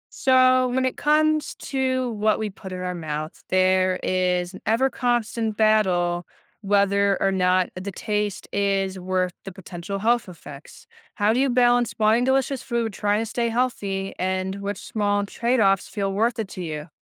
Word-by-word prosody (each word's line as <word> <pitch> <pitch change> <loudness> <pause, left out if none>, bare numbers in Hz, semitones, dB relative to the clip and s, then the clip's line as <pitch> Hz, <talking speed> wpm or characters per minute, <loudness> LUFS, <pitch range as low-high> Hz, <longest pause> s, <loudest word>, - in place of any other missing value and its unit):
So, 255 -1 +4
when 260 +1 0
it 255 - -1
comes 305 0 +1
to 260 -2 -1
what 215 0 +1
we 215 -1 -3
put 190 0 -10
in 185 0 -5
our 180 0 -3
mouths, 155 -1 -5
there 185 0 +2
is 180 0 0
an 190 - -10
ever 245 +5 +2
constant 230 -3 -1
battle 180 -5 +2 0.3
whether 200 -1 +2
or 195 - +2
not 185 -1 +2
the 185 +2 -5
taste 210 0 -3
is 195 -1 0
worth 185 0 -1
the 195 - -7
potential 180 +1 -7
health 230 +1 +1
effects. 150 -4 -12 0.3
How 210 0 +2
do 245 - +1
you 275 0 +2
balance 245 -1 +3
buying 220 +3 +3
delicious 265 0 +1
food, 235 -4 -2
trying 205 +2 0
to - - -4
stay 235 +1 -1
healthy, 205 -5 -2
and 185 +1 -2
which 200 -1 -3
small 205 -1 -1
trade-offs 215 -4 +1
feel 195 -2 -3
worth 225 +4 +1
it 220 -3 -3
to 185 - -7
you? 155 -1 -6
205 Hz, 170 wpm, -23 LUFS, 185-240 Hz, 0.3 s, So